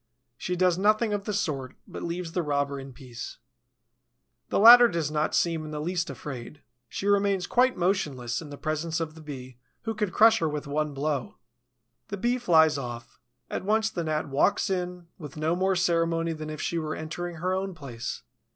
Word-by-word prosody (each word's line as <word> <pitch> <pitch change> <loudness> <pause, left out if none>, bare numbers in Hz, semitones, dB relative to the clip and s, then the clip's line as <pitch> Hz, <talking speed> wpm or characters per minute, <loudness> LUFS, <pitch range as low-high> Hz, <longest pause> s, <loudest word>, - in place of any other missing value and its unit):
She 180 +8 -3
does 180 0 +2
nothing 215 +2 +3
of 200 -1 -2
the 210 - -2
sort, 140 -10 -2
but - - -8
leaves 170 0 -4
the 180 - 0
robber 140 -2 -1
in 135 0 -9
peace. 125 -3 -9 1.1
The - - 0
latter 240 +3 +10
does 165 -8 -2
not 150 0 0
seem 165 -2 +1
in 155 - -7
the 150 -1 -4
least 175 +3 -1
afraid. 140 0 -8 0.3
She - - -5
remains 200 -2 +2
quite 255 +4 +3
motionless 155 -10 -1
in 155 - -9
the 145 - -8
presence 155 +3 -2
of 160 -2 -3
the 160 - -13
Bee 130 -5 -9 0.2
who 225 - -2
could 210 -3 -2
crush 225 +3 +6
her 160 - +1
with 150 0 -4
one 150 0 -2
blow. 140 -2 -2 0.7
The 200 - -5
Bee 240 +5 0
flies 160 - +4
off. 120 -2 -7 0.3
At - - -4
once 220 +2 +1
the 175 - -3
Gnat 155 -1 -1
walks 145 +8 +2
in, 180 -1 -3
with 150 -3 -9
no 155 +2 +1
more 190 +1 +1
ceremony 165 -2 +1
than 155 -1 -6
if 155 -1 -5
she 170 - -1
were 155 -1 -3
entering 170 +2 -5
her 180 +3 -1
own 190 -1 -2
place. 125 -7 -6
165 Hz, 195 wpm, -27 LUFS, 150-190 Hz, 1.1 s, latter